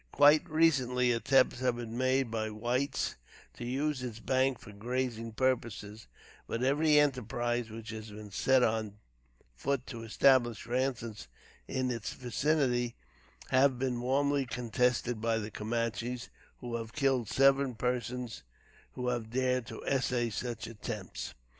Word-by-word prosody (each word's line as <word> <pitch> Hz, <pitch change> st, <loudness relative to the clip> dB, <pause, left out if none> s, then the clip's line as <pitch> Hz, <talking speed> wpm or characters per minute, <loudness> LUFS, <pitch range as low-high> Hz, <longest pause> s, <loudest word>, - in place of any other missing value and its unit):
Quite 150 Hz, +4 st, +5 dB
recently, 130 Hz, -6 st, +3 dB
attempts 125 Hz, +2 st, +3 dB
have 125 Hz, -2 st, +1 dB
been 115 Hz, -1 st, -6 dB
made 130 Hz, -1 st, +1 dB
by 110 Hz, -1 st, -1 dB
whites 120 Hz, -, -1 dB, 0.4 s
to -, -, -8 dB
use 135 Hz, +3 st, -1 dB
its 120 Hz, -4 st, -5 dB
banks 130 Hz, +1 st, +1 dB
for -, -, -10 dB
grazing 115 Hz, +1 st, -3 dB
purposes, 110 Hz, -4 st, -1 dB, 0.4 s
but 115 Hz, -, -2 dB
every 150 Hz, +3 st, +4 dB
enterprise 120 Hz, -4 st, +1 dB
which 110 Hz, 0 st, -7 dB
has 110 Hz, 0 st, -7 dB
been 105 Hz, 0 st, -10 dB
set 130 Hz, +6 st, +3 dB
on 110 Hz, -3 st, 0 dB, 0.6 s
foot 135 Hz, -, -1 dB
to 115 Hz, -3 st, -7 dB
establish 120 Hz, 0 st, +3 dB
ranches 120 Hz, -, -2 dB, 0.4 s
in 130 Hz, -1 st, -1 dB
its 115 Hz, -3 st, -4 dB
vicinity, 125 Hz, -2 st, 0 dB, 0.5 s
have 130 Hz, 0 st, +4 dB
been 125 Hz, -1 st, -1 dB
warmly 140 Hz, +2 st, +1 dB
contested 125 Hz, -1 st, 0 dB
by 115 Hz, 0 st, +1 dB
the 110 Hz, 0 st, -4 dB
Camanches, 115 Hz, +3 st, -2 dB, 0.3 s
who 120 Hz, -1 st, -3 dB
have 115 Hz, 0 st, -7 dB
killed 135 Hz, -7 st, +1 dB
several 135 Hz, -1 st, +4 dB
persons 125 Hz, -1 st, -2 dB, 0.5 s
who 125 Hz, -1 st, -2 dB
have 120 Hz, -3 st, -2 dB
dared 125 Hz, 0 st, 0 dB
to -, -, -8 dB
essay 125 Hz, -3 st, +1 dB
such 115 Hz, +1 st, -4 dB
attempts. 105 Hz, -3 st, -6 dB
125 Hz, 135 wpm, -31 LUFS, 115-130 Hz, 0.6 s, Quite